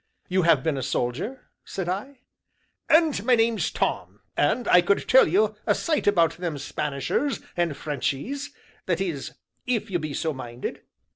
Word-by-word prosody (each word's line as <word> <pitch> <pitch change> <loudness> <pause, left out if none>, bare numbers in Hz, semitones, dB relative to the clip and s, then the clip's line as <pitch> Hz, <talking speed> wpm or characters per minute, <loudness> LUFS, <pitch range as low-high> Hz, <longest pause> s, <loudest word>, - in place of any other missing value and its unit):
"You 185 +1 +2
have 170 -1 +4
been 160 -3 0
a - - -3
soldier?" 135 - -3 0.2
said 190 -3 -5
I. 230 +9 -4 0.7
"And 315 -9 +4
my 250 +1 +5
name's 225 -1 +2
Tom, - - -2
and 245 - +1
I 180 - +7
could 195 +3 +1
tell 260 - +7
you 210 +6 +2
a - - +4
sight 310 -8 -1
about 170 -6 +3
them 170 -4 -3
Spanishers, 150 - -2 0.2
and 170 -5 0
Frenchies 155 - -3 0.4
that 175 -2 +1
is, 170 -8 -3 0.3
if 230 -4 -1
you 175 - +1
be 155 -3 -4
so 160 -2 -1
minded?" 120 -2 -6
180 Hz, 160 wpm, -25 LUFS, 155-235 Hz, 0.7 s, I